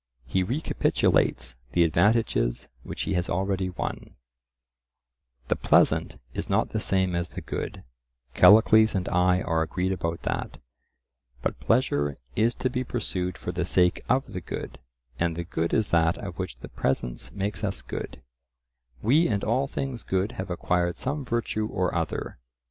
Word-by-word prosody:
He 95 Hz, +9 st, 0 dB
recapitulates 75 Hz, -, +1 dB, 0.2 s
the 85 Hz, -, +5 dB
advantages 85 Hz, -, +2 dB
which -, -, -5 dB
he -, -, -1 dB
has 90 Hz, -1 st, 0 dB
already 95 Hz, +1 st, 0 dB
won:— 90 Hz, -, -5 dB, 1.3 s
The -, -, +2 dB
pleasant -, -, +3 dB, 0.2 s
is -, -, -4 dB
not -, -, +1 dB
the -, -, -1 dB
same 95 Hz, -1 st, +1 dB
as 85 Hz, 0 st, -1 dB
the -, -, -7 dB
good—Callicles 60 Hz, -, +3 dB
and 90 Hz, -2 st, -1 dB
I 90 Hz, +1 st, +3 dB
are 80 Hz, -2 st, +1 dB
agreed 90 Hz, +4 st, -1 dB
about 85 Hz, -3 st, -3 dB
that,—but 60 Hz, 0 st, -7 dB
pleasure 75 Hz, -, +1 dB, 0.2 s
is 115 Hz, +2 st, +2 dB
to 130 Hz, -, -1 dB
be 125 Hz, 0 st, -1 dB
pursued 95 Hz, -7 st, -3 dB
for 90 Hz, -, -4 dB
the 90 Hz, 0 st, -2 dB
sake 90 Hz, 0 st, +2 dB
of 130 Hz, -2 st, +1 dB
the 90 Hz, -, -4 dB
good, -, -, -6 dB, 0.4 s
and 85 Hz, -1 st, +1 dB
the 85 Hz, -, -3 dB
good 85 Hz, -1 st, -2 dB
is 110 Hz, -, +1 dB
that 85 Hz, +2 st, +3 dB
of 95 Hz, -3 st, -7 dB
which 95 Hz, -9 st, -4 dB
the -, -, -8 dB
presence -, -, -2 dB
makes 100 Hz, +1 st, -3 dB
us 100 Hz, -2 st, -1 dB
good; -, -, -6 dB, 0.8 s
we 145 Hz, +10 st, +4 dB
and 100 Hz, -3 st, -1 dB
all 130 Hz, +5 st, +1 dB
things 135 Hz, -4 st, -4 dB
good 95 Hz, +3 st, -1 dB
have 95 Hz, 0 st, -6 dB
acquired 90 Hz, 0 st, 0 dB
some 145 Hz, +2 st, -2 dB
virtue 115 Hz, -3 st, -1 dB
or 90 Hz, -3 st, -1 dB
other. 80 Hz, -6 st, -3 dB
90 Hz, 155 wpm, -26 LUFS, 80-110 Hz, 1.3 s, the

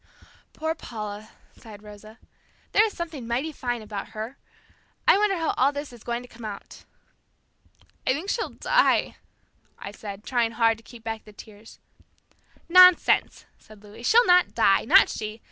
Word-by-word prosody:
"Poor 320 Hz, +1 st, -2 dB
Paula!" 215 Hz, -7 st, -8 dB, 0.3 s
sighed 210 Hz, -2 st, -14 dB
Rosa. 210 Hz, +1 st, -13 dB, 0.5 s
"There 420 Hz, -, +5 dB
is 435 Hz, -2 st, -3 dB
something 315 Hz, -8 st, -6 dB
mighty 255 Hz, +7 st, -2 dB
fine 245 Hz, -5 st, -4 dB
about 205 Hz, -2 st, -7 dB
her. 225 Hz, +5 st, -5 dB, 0.7 s
I -, -, +7 dB
wonder 400 Hz, -1 st, +1 dB
how 325 Hz, -1 st, -1 dB
all 270 Hz, +2 st, +3 dB
this 285 Hz, -2 st, -7 dB
is 235 Hz, -, -14 dB
going 240 Hz, +1 st, -4 dB
to -, -, -13 dB
come 235 Hz, -1 st, -15 dB
out." 205 Hz, -2 st, -9 dB, 1.2 s
"I 255 Hz, -, +4 dB
think 315 Hz, +8 st, -5 dB
she'll 460 Hz, -, -2 dB
die," -, -, +1 dB, 0.6 s
I 200 Hz, -, -8 dB
said, 205 Hz, -1 st, -9 dB
trying 235 Hz, -2 st, -1 dB
hard 225 Hz, -1 st, +2 dB
to -, -, -20 dB
keep 235 Hz, -1 st, -14 dB
back 225 Hz, -1 st, -5 dB
the 210 Hz, -, -16 dB
tears. 215 Hz, +1 st, -14 dB, 0.9 s
"Nonsense," 365 Hz, 0 st, +5 dB
said 215 Hz, -1 st, -18 dB
Louis, 210 Hz, +2 st, -13 dB
"she'll 460 Hz, -, +4 dB
not 360 Hz, 0 st, +3 dB
die! -, -, +3 dB
Not -, -, +6 dB
she! 215 Hz, +1 st, -6 dB
235 Hz, 160 wpm, -25 LUFS, 215-315 Hz, 1.2 s, I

